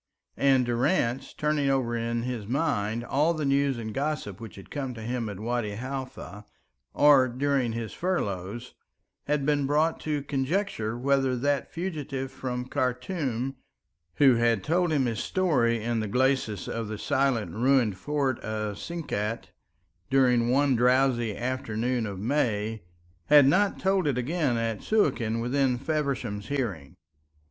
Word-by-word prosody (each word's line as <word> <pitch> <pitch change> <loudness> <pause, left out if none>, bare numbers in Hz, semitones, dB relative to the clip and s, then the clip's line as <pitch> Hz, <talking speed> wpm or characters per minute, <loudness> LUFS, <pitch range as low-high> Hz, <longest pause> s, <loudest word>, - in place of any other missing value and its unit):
And 135 -2 +4
Durrance, 120 +1 0
turning 150 -2 0
over 130 -3 +1
in 115 0 -2
his 120 -5 -4
mind 120 -5 0
all 150 +7 +1
the 155 -2 -2
news 140 -1 +2
and 110 -2 -5
gossip 135 -8 -3
which 115 - -9
had 95 - -13
come 135 -4 -4
to 110 - -8
him 120 -1 -2
at 100 -2 -7
Wadi 115 -2 -2
Halfa 130 -5 -6 0.5
or 140 -3 +6
during 130 -1 0
his 115 -1 -4
furloughs, 120 - -3 0.5
had 145 -1 0
been 145 -2 +1
brought 155 +3 +2
to 150 -2 -2
conjecture 135 - -1
whether 135 0 +1
that 140 +2 0
fugitive 145 -7 -4
from 125 -1 -4
Khartum, 130 0 -2 0.6
who 135 -4 +5
had 115 -4 +2
told 175 +2 +1
him 140 -4 +2
his 115 -3 -2
story 125 - +1
in 120 0 0
the 110 - -2
glacis 125 -4 0
of 115 -1 -3
the 110 0 -5
silent 135 -5 0
ruined 120 -3 +2
fort 135 +5 -1
of 105 -1 -4
Sinkat 115 -10 -4 0.6
during 125 -3 +3
one 135 +1 +3
drowsy 125 -2 +2
afternoon 120 -1 -2
of 100 -2 -6
May, 110 -3 0 0.5
had 145 +3 +7
not 195 +8 +3
told 190 -3 +1
it 135 -4 +1
again 135 -1 0
at 115 -2 -2
Suakin 125 - +1
within 130 +1 +1
Feversham's 135 -8 -2
hearing. 110 - -3
130 Hz, 145 wpm, -27 LUFS, 115-140 Hz, 0.6 s, had